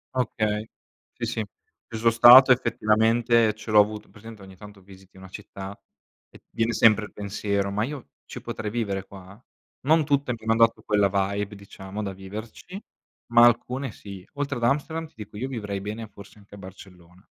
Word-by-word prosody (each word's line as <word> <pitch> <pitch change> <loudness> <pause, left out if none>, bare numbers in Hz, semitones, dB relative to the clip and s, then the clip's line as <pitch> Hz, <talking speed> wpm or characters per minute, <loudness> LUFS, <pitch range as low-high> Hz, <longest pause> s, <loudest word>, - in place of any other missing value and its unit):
Okay, 110 -4 -1 0.5
sì, 120 - -3
sì. 115 -2 -3 0.4
Ci 115 - -7
son 115 +1 +3
stato 125 +3 +9
effettivamente, 115 -1 +2
ce 110 0 -8
l'ho 105 - +6
avuto 105 +1 +1
hai - - -25
presente 110 -1 -13
ogni 95 -1 -13
tanto 105 0 -14
visiti 95 0 -18
una 95 - -12
città 100 0 -9 0.5
e - - -18
viene 115 +1 -1
sempre 110 -1 +4
il - - -14
pensiero, 100 -1 -3
ma 105 +2 -1
io 140 +1 -7 0.2
ci - - -9
potrei 110 -2 -5
vivere 100 -4 -3
qua? 100 +4 -14 0.4
Non 155 0 +3
tutte, 140 -3 0
mi - - -7
hanno 115 0 +2
dato 115 - -7
quella 105 -2 +2
vibe, 100 +1 -2
diciamo 100 +1 -8
da 100 -1 -4
viverci, 110 - -9 0.5
ma 120 0 +7
alcune 125 +2 0
sì. 100 -3 -11
Oltre 140 -2 -3
ad 120 - -6
Amsterdam, 160 +5 -1
ti - - -30
dico 105 -1 -10
io 130 +5 -4
vivrei 105 -6 -5
bene, 105 +2 -6
forse 100 0 -15
anche 100 0 -20
a 100 - -10
Barcellona. 90 -2 -15
105 Hz, 185 wpm, -25 LUFS, 100-120 Hz, 0.5 s, stato